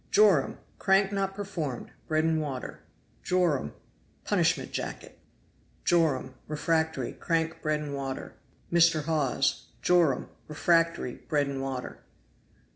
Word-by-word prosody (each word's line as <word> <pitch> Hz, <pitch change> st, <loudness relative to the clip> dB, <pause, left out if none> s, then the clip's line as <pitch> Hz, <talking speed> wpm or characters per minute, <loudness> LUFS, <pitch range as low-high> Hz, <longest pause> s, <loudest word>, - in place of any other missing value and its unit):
Joram.Crank 195 Hz, +1 st, +3 dB
not 195 Hz, -1 st, -1 dB
performed 170 Hz, -11 st, -4 dB, 0.2 s
bread 155 Hz, 0 st, +2 dB
and 160 Hz, -1 st, +2 dB
water. 135 Hz, -4 st, -5 dB, 0.4 s
Joram.Punishment 175 Hz, -, -1 dB
jacket. -, -, -6 dB, 0.7 s
Joram.Refractory 155 Hz, -1 st, 0 dB
crank 165 Hz, -1 st, -1 dB
bread 155 Hz, -1 st, 0 dB
and 145 Hz, -2 st, -5 dB, 1.9 s
Joram. 170 Hz, -7 st, +3 dB, 0.2 s
Refractory 165 Hz, -3 st, +2 dB
bread 145 Hz, -3 st, +2 dB
and 135 Hz, -1 st, -3 dB
water. 135 Hz, -2 st, -5 dB
160 Hz, 80 wpm, -28 LUFS, 140-175 Hz, 1.9 s, Joram.Crank